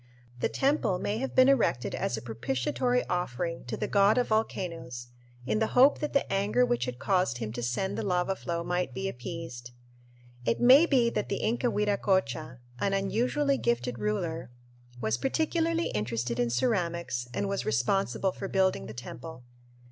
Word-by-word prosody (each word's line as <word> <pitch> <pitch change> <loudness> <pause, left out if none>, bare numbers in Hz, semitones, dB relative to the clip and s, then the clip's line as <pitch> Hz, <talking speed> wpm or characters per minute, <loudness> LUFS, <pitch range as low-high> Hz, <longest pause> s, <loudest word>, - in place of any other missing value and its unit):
The - - +1
temple 275 -9 +1
may 205 +4 -2
have 270 - -4
been 255 0 +7
erected 235 - +2
as 120 - -1
a 110 - -7
propitiatory 130 - -1
offering 170 -1 -2
to 120 - -4
the - - -2
god 200 +2 +4
of 250 - +1
volcanoes 165 - -2 0.4
in 215 - 0
the 220 +2 -1
hope 270 +3 +6
that 300 - -2
the 280 - +2
anger 105 +6 +2
which 120 0 0
had 125 -1 -5
caused 180 -4 +1
him 110 -2 -4
to 120 - -4
send 125 +11 -1
the - - -2
lava 180 0 0
flow 170 -2 -3
might 180 -6 -2
be 195 - -2
appeased. 125 -4 -6 0.7
It 115 - 0
may 265 +7 +7
be 245 -6 +3
that - - -2
the - - -2
Inca 240 +3 +1
Viracocha, 190 - 0 0.2
an 195 - 0
unusually 250 +8 +1
gifted 120 0 -1
ruler, 140 +11 -2 0.5
was 110 +1 0
particularly 330 +3 0
interested 115 +2 -2
in 120 -1 +2
ceramics 170 - -1
and 200 +10 -2
was 195 0 -2
responsible 125 - +1
for 195 - -6
building 190 0 +1
the 110 - -8
temple. 125 +3 -8
175 Hz, 170 wpm, -29 LUFS, -, 0.7 s, been